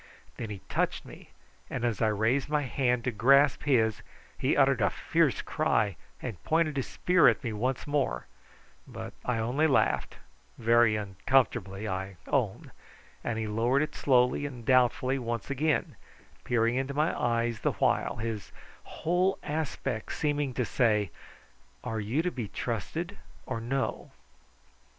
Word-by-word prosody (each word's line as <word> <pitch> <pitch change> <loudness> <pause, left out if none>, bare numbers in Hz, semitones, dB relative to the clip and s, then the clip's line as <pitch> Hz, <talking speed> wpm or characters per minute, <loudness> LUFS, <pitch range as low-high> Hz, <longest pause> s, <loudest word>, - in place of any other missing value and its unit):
Then 115 - -5
he 100 -3 -7
touched - - -1
me, - - -13 0.4
and 120 - -2
as 115 -4 -1
I 110 - +4
raised 110 +7 +1
my 150 -1 +1
hand 125 -2 0
to 125 - 0
grasp 140 +8 +4
his 110 -6 +2 0.3
he - - 0
uttered - - +4
a - - +4
fierce - - +1
cry 105 -4 +1 0.3
and 95 -7 -6
pointed 160 -2 +1
his 135 - -1
spear 180 0 +4
at - - +3
me 115 -3 -2
once 125 +4 -2
more, 140 - -1 0.6
but - - -7
I 125 -2 0
only 125 +8 +1
laughed 140 - +1 0.4
very 115 -1 +4
uncomfortably 105 -1 0
I 95 0 -4
own - - -1 0.5
and 120 -2 -2
he 110 - -2
lowered 115 +6 +2
it 155 -1 -5
slowly 125 +1 +2
and 125 -5 -9
doubtfully 130 +1 +3
once 120 +2 -4
again, 150 +2 0 0.5
peering 115 -1 +2
into 135 +1 -2
my 155 +3 +1
eyes 115 -1 0
the - - 0
while, - - +1
his 110 -3 -4 0.3
whole 180 +4 0
aspect 145 -7 -3
seeming 145 -2 0
to 125 - 0
say, 105 -8 +1 0.7
"Are 110 -1 -3
you 115 +10 0
to 180 - 0
be 120 -8 -4
trusted - - -4 0.3
or 115 - -4
no?" 130 +3 -2
120 Hz, 150 wpm, -29 LUFS, 110-140 Hz, 0.7 s, I